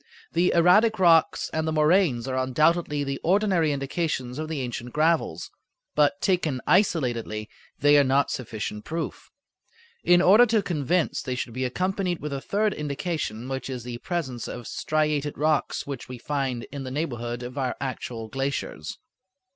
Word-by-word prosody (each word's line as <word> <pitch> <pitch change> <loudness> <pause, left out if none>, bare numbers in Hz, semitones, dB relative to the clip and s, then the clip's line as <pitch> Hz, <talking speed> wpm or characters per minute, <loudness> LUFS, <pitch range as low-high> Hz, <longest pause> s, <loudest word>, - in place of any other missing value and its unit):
The 175 +2 +2
erratic 210 +7 +5
rocks 170 -3 +4
and 160 0 -1
the - - 0
moraines 155 -5 +3
are 130 - -2
undoubtedly 150 +4 +1
the 140 -1 -3
ordinary 185 -4 +2
indications 140 -2 -2
of 155 - -3
the 155 -2 -3
ancient 120 -1 -5
gravels, 160 +2 +1 0.4
but, 150 +6 +3
taken 170 -9 +1
isolatedly, 120 - +1 0.3
they 145 0 +5
are - - +5
not 135 +1 +2
sufficient 110 -3 -5
proof. 165 0 -5 0.7
In 175 0 +5
order 210 +7 +7
to 220 -2 +2
convince 170 0 0
they 130 -2 -3
should 125 -2 -4
be 130 +2 -2
accompanied 180 +5 -1
with 150 -1 -5
a 135 - -3
third 210 +5 0
indication, 140 -5 -3
which 135 0 -4
is 125 -3 -5
the 120 -1 -6
presence 140 -9 -3
of 120 -1 -7
striated 150 -1 -1
rocks 155 0 0
which 140 -4 -7
we 125 - -6
find 130 -2 -2
in 140 -2 -5
the 130 - -5
neighborhood 120 -4 -3
of 125 +2 -7
our 130 -2 -1
actual 125 -4 -5
glaciers. 135 - -4
145 Hz, 160 wpm, -25 LUFS, 130-170 Hz, 0.7 s, order